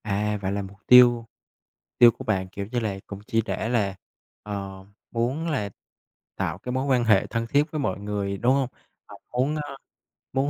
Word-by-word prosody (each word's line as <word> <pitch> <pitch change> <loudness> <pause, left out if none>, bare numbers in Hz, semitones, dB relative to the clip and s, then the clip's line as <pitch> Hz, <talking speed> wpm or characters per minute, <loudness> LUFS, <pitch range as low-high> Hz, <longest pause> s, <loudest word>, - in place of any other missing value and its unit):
À, 105 0 0
vậy 95 -1 -1
là 100 0 -1
mục 100 0 -9
tiêu 120 -2 +7 0.7
tiêu 120 -1 +8
của 130 - -10
bạn, 95 -6 0
kiểu 100 +1 -5
như 125 - 0
là, 105 -4 -2
cũng 100 - -7
chỉ 115 - +2
để 110 - -2
là, 105 -5 +1 0.5
ờ, 95 -2 -6 0.3
muốn 125 +8 -1
là 105 -10 -1 0.7
tạo - - -2
cái 125 - -6
mối 130 +2 -1
quan 130 -3 +3
hệ 105 -4 +4
thân 115 0 -2
thiết 145 +5 +2
với 155 - -2
mọi 95 -9 -1
người, 100 -1 -3
đúng 120 +5 +3
hông? 135 -1 +1 0.4
À, - - -11 0.2
muốn, 130 +5 +1
a, 145 -2 -5 0.6
muốn 135 +2 +1
115 Hz, 195 wpm, -25 LUFS, 100-130 Hz, 0.7 s, tiêu